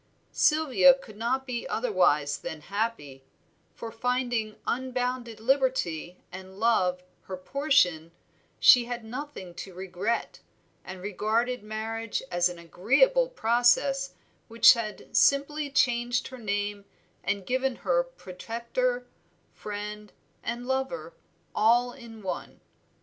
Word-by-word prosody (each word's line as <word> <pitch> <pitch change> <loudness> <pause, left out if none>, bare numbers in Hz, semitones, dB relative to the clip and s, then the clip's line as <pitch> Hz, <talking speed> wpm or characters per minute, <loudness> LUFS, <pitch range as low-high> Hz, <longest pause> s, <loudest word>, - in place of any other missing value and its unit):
Sylvia 275 -5 +5
could 235 -6 -14
not 245 +5 -1
be 245 -3 -4
otherwise 175 - +1
than 155 - -7
happy, 180 -8 -4 0.5
for 230 - -7
finding 240 -2 -1
unbounded 250 -2 -2
liberty 225 - 0
and 190 +1 -10
love 185 -6 +2 0.2
her 185 - -6
portion, 185 - +1 0.5
she 245 -1 +7
had 240 -1 -5
nothing 250 -7 -7
to 185 +1 -9
regret, 190 +5 -3 0.4
and 185 -1 -9
regarded 220 +5 -1
marriage 220 +2 -4
as 175 0 +2
an 175 - -8
agreeable 275 - +2
process 260 - +2 0.3
which 230 0 +7
had 225 -3 -6
simply 285 +1 +3
changed 245 -2 +1
her 260 -1 -10
name 205 -1 -3 0.4
and 200 -2 -2
given 260 +2 0
her - - +1
protector, - - -3 0.5
friend, 210 0 -7 0.3
and 240 +1 -4
lover 265 - -2 0.4
all 240 +3 +3
in 230 -5 -12
one. 185 - -5
230 Hz, 110 wpm, -27 LUFS, 200-260 Hz, 0.5 s, she